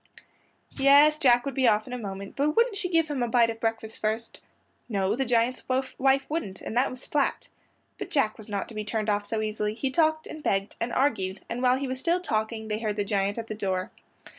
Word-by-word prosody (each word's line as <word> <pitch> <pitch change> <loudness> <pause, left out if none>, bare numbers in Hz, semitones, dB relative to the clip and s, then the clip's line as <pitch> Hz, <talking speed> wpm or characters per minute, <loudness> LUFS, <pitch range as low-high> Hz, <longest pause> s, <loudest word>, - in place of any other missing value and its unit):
Yes, 290 +2 +6
Jack 245 -3 +4
would 275 - -3
be 260 0 +2
off 215 -1 +3
in 250 - -8
a - - -2
moment, 195 -2 -7
but 295 +2 +1
wouldn't 465 -2 +3
she 395 -3 -1
give 330 -2 +2
him 290 -4 -3
a 240 - +1
bite 230 -1 +3
of 225 - -9
breakfast 225 -1 -3
first? 220 +2 -2 0.5
No, 200 -1 0
the 270 +2 -1
giant's 240 +1 +1 0.4
wife 270 +1 +3
wouldn't, 210 - -4
and - - -6
that 250 +3 +3
was 255 0 -9
flat. 290 -2 -1 0.5
But - - -5
Jack 270 -8 +1
was 215 0 -12
not 200 -1 -2
to - - -9
be 215 0 -3
turned 215 0 -1
off 205 0 -1
so 220 -1 -1
easily; 215 0 -2
he 265 +3 -2
talked 315 +1 +2
and 310 - -8
begged 195 -6 -1
and 235 - -1
argued, 205 -9 0
and 240 +1 -3
while 255 0 +4
he 275 0 -3
was 260 0 -4
still 340 +6 +1
talking 220 -7 -2
they 215 0 -2
heard 215 -2 -2
the 205 -1 -1
giant 200 0 0
at 230 - -4
the 220 - -5
door. 190 -3 -2
230 Hz, 235 wpm, -27 LUFS, 215-275 Hz, 0.5 s, Yes